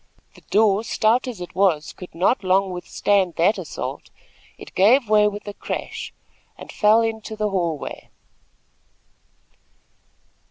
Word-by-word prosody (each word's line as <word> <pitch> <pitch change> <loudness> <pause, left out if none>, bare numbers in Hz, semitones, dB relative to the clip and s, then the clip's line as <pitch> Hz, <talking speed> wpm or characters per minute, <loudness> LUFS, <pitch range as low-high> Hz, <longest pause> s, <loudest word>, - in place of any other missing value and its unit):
The - - -18
door, 210 0 +3
stout 230 +3 +1
as 240 -6 -6
it 175 - -8
was, 180 -5 +1
could 180 - -12
not 195 +5 +1
long 190 +1 +2
withstand 185 0 0
that 185 +7 +2
assault. - - -6 0.5
It - - -12
gave 235 +6 +4
way 210 0 +4
with 210 0 -6
a 205 - -5
crash, - - -6 0.5
and - - -10
fell 215 +2 +4
into 220 -1 -3
the 215 -1 -1
hall 170 -5 0
way. - - -8
205 Hz, 135 wpm, -22 LUFS, 185-220 Hz, 0.5 s, gave